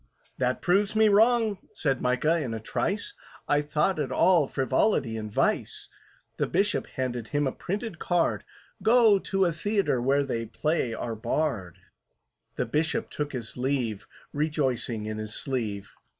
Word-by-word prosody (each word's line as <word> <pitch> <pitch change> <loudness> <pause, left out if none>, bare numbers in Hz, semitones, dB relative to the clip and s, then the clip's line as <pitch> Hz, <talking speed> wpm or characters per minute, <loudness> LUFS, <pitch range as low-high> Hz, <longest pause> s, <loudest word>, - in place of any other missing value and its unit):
"That 125 0 0
proves 200 +4 +2
me 220 0 +5
wrong," 220 -1 +4 0.2
said 135 -4 0
MICAH, 130 +7 +2
in 120 -6 -3
a - - -4
trice: 210 - -2 0.3
"I 145 0 +3
thought 150 +4 0
it 145 - -2
all 175 -6 +4
frivolity 130 - +1
and 110 -1 -5
vice." - - 0 0.5
The - - 0
Bishop 200 +4 +1
handed 125 -3 -3
him 145 +2 0
a 135 - 0
printed 200 - -5
card; 175 -2 +1 0.4
"Go 225 -3 +5
to 195 0 +1
a 170 - +2
theatre 195 - 0
where 140 +3 +2
they 115 -4 -3
play 150 -2 -1
our 115 -1 -4
Bard." 110 - -2 0.8
The - - -1
Bishop 155 +1 -1
took 145 -1 -3
his 120 -3 -6
leave, 125 -5 -1 0.3
Rejoicing 135 -7 -1
in 110 0 -4
his 110 -1 -5
sleeve. 110 -7 -3
145 Hz, 150 wpm, -27 LUFS, 120-185 Hz, 0.8 s, me